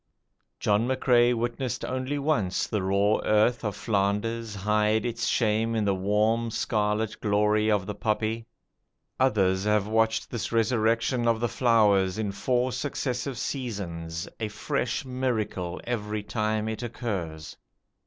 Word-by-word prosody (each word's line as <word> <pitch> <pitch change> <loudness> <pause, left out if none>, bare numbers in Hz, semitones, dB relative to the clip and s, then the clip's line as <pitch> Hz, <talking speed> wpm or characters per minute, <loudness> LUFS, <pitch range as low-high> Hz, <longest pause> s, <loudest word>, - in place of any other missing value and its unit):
John 105 +3 +2
McCrae 125 -2 +3
witnessed 120 +1 -2
only 130 +3 -2
once 140 -11 0
the 105 - -2
raw 100 +3 +2
earth 110 +4 +3
of 105 -2 -2
Flanders 105 +2 -1
hide 105 +2 +1
its 115 -1 -2
shame 115 0 +1
in 110 -2 +1
the 100 - +2
warm 105 +4 +1
scarlet 110 -1 -1
glory 105 +1 +2
of 105 -3 +2
the 105 - -4
poppy. 110 +2 -1 0.7
Others 95 -7 +2
have 105 -1 +2
watched 110 +1 +1
this 120 - -3
resurrection 115 +1 +1
of 115 -1 +2
the 120 - +1
flowers 105 -6 +3
in 105 -2 -1
four 125 +5 0
successive 130 -1 -3
seasons, 90 - -4
a 110 - -1
fresh 125 +4 -2
miracle 115 -9 -2
every 105 -3 -3
time 110 0 -1
it 110 +1 -4
occurs. 95 -10 -4
110 Hz, 135 wpm, -27 LUFS, 105-120 Hz, 0.7 s, McCrae